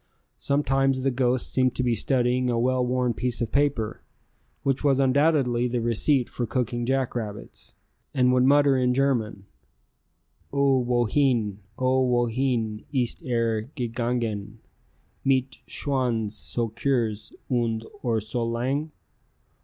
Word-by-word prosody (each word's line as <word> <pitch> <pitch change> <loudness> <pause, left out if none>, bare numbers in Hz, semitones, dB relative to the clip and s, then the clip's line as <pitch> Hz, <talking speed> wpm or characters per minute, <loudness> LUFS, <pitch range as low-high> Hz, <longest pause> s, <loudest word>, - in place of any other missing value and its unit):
Sometimes 135 -2 +1
the 135 - +2
ghost 125 0 0
seemed 130 -2 +2
to 130 - 0
be 120 -1 +2
studying 125 +1 +1
a 120 - 0
well 125 +2 +1
worn 125 -1 0
piece 125 +1 -2
of 115 -2 -2
paper, 140 -6 0 0.6
which 135 0 0
was 140 -2 +3
undoubtedly 135 -3 +2
the 120 0 -1
receipt 120 +3 +1
for 120 - -4
cooking 120 0 -2
jackrabbits, 120 -6 -3 0.4
and 125 -1 +3
would 125 0 +4
mutter 140 +1 +5
in 125 -1 +2
German, 120 -7 0 1.1
"O 140 -1 +3
wohene, 120 -3 +1 0.2
O 130 0 +2
wohene 120 -3 0
ist 125 -5 -1
er 115 -2 -1
gegangen, 115 -4 -2 0.7
mit 130 -1 +1
Schwanz 125 -6 -1
so 115 +1 -3
kurz 115 -2 -1 0.2
und 115 -3 -1 0.2
Ohr 115 -3 0
so 110 +3 -3
lang? 130 +7 -2
125 Hz, 125 wpm, -25 LUFS, 115-135 Hz, 1.1 s, mutter